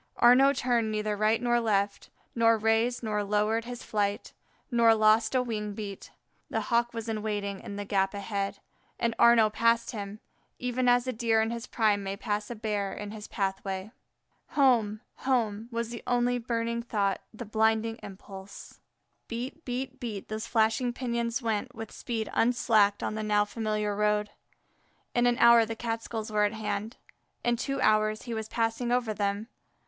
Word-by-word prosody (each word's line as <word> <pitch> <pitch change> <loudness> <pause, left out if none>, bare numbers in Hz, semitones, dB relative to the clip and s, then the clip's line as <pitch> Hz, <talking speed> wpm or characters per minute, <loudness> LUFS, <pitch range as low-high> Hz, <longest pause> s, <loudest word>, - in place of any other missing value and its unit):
Arnaux 260 +3 +6
turned 240 -4 +1
neither 215 0 -1
right 215 +2 +2
nor 240 -1 +2
left, 200 -3 0 0.2
nor 230 -1 +4
raised 225 +3 +1
nor 210 -2 -1
lowered 210 +3 +1
his 245 0 -7
flight, 205 -1 -2 0.4
nor 230 -1 +5
lost 220 +2 +4
a 255 - +3
wing 210 -3 -3
beat. 200 -2 -7 0.4
The - - -1
Hawk 235 0 +3
was 230 -1 -6
in 220 -1 -2
waiting 205 -2 -3
in 200 - -7
the 205 0 -4
gap 195 0 0
ahead, 200 0 -3 0.4
and 230 -1 0
Arnaux 230 -2 +6
passed 230 +1 +2
him, 205 -1 -6 0.4
even 250 0 0
as 245 0 +4
a 255 - -2
Deer 225 -1 +2
in 220 +1 +1
his 235 +1 -5
prime 210 -3 +2
may 195 0 -4
pass 210 +1 -2
by - - -5
a - - -10
Bear 210 -3 -2
in 205 0 -6
his 210 -1 -8
pathway. 195 0 -3 0.7
Home! 225 -6 +3 0.2
home! 230 -4 0
was 230 0 -2
the 235 -1 -7
only 245 0 +2
burning 235 0 -2
thought, 200 -4 -1
the 235 +2 -8
blinding 220 +1 +1
impulse. 195 0 -11 0.5
Beat, 250 +7 -5
beat, 260 +1 -4
beat, 215 -5 -6
those 215 +1 -4
flashing 230 +2 +2
pinions 235 0 -2
went 230 +3 -2
with 225 -1 -7
speed 225 -3 -4
unslacked 225 -4 +3
on - - -1
the 215 - -3
now 210 -1 +2
familiar 210 -1 -2
road. 210 0 +1 0.8
In 240 0 +3
an 240 0 +2
hour 235 -1 +7
the 225 0 -4
Catskills 225 -1 -4
were 210 -1 +3
at 205 - -1
hand. 215 +1 -4 0.5
In 240 0 +2
two 275 +3 -3
hours 215 -1 +2
he 240 - -5
was 220 -1 -4
passing 230 +1 -1
over 245 -3 +1
them. 205 +1 -2
220 Hz, 175 wpm, -28 LUFS, 210-235 Hz, 0.8 s, hour